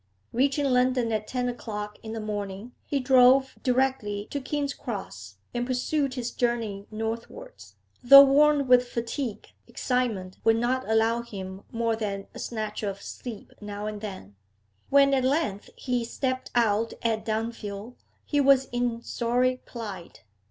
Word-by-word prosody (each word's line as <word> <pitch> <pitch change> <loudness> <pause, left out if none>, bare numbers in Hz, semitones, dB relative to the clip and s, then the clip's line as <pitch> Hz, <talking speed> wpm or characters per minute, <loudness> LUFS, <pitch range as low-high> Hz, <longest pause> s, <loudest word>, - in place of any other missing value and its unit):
Reaching 275 +3 +2
London 250 -2 +2
at 215 -1 -2
ten 250 -1 -1
o'clock 210 -4 -5
in 220 0 -7
the 225 - -4
morning, 205 +1 -5
he 280 - -1
drove 260 +1 +5
directly 250 -6 0
to 285 - -2
King's 285 +1 -2
Cross, 100 - -7 0.2
and 240 - -1
pursued 260 +2 0
his 245 -2 -3
journey 225 -5 -2
northwards. 230 - -6 0.3
Though 275 +3 +11
worn 285 +1 +4
with 250 0 +5
fatigue, 235 0 -4 0.2
excitement 225 -8 -2
would 225 0 +5
not 245 +2 -1
allow 225 +1 +2
him 195 -4 -8
more 230 -1 0
than 200 -3 -4
a - - -9
snatch 215 -2 -4
of 200 -2 -3
sleep 230 -1 -8
now 205 0 -6
and 210 -1 -5
then. 190 - -8 0.5
When 275 0 +5
at 265 -2 +2
length 260 -7 0
he 250 -2 -1
stepped 255 +2 -3
out 225 -1 +2
at 225 -2 0
Dunfield, 220 0 -4 0.3
he 290 -1 +1
was 270 -1 +4
in 240 -1 -1
sorry 250 +2 0
plight. 205 -7 -8
235 Hz, 145 wpm, -27 LUFS, 210-255 Hz, 0.5 s, Though